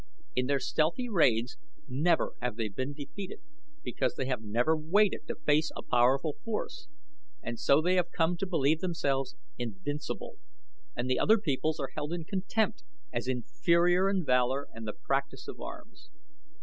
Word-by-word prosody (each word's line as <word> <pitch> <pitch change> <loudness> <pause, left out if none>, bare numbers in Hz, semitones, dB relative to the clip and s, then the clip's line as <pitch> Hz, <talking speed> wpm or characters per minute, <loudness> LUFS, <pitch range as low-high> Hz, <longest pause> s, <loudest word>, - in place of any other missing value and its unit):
In 125 0 +1
their 140 0 +2
stealthy 160 - +1
raids 125 - +2 0.3
never 155 +6 +2
have 125 -2 -1
they 110 -1 -2
been 130 +8 -3
defeated, 150 +7 -7 0.4
because - - -1
they 130 - -2
have 125 -3 -1
never 120 +8 +2
waited 190 +7 +2
to - - -3
face 150 +2 +2
a - - -6
powerful 135 +5 +3
force; 225 +8 -4 0.6
and 120 -1 -4
so 140 +3 +4
they 180 +2 +3
have 180 - +2
come 165 +1 +2
to 195 - -2
believe 160 -3 +2
themselves 140 -7 -1 0.2
invincible, 120 - -4 0.6
and 120 - -2
the 130 0 +2
other 220 +2 +5
peoples 155 -3 -1
are 135 -2 -3
held 150 +2 -3
in 175 -1 -3
contempt 210 - -1 0.3
as - - -2
inferior 175 - +3
in 190 -4 0
valor 130 +2 +2
and 115 -1 -7
the 105 - -3
practice 140 - -2
of - - -7
arms." - - -9
145 Hz, 160 wpm, -30 LUFS, 130-175 Hz, 0.6 s, other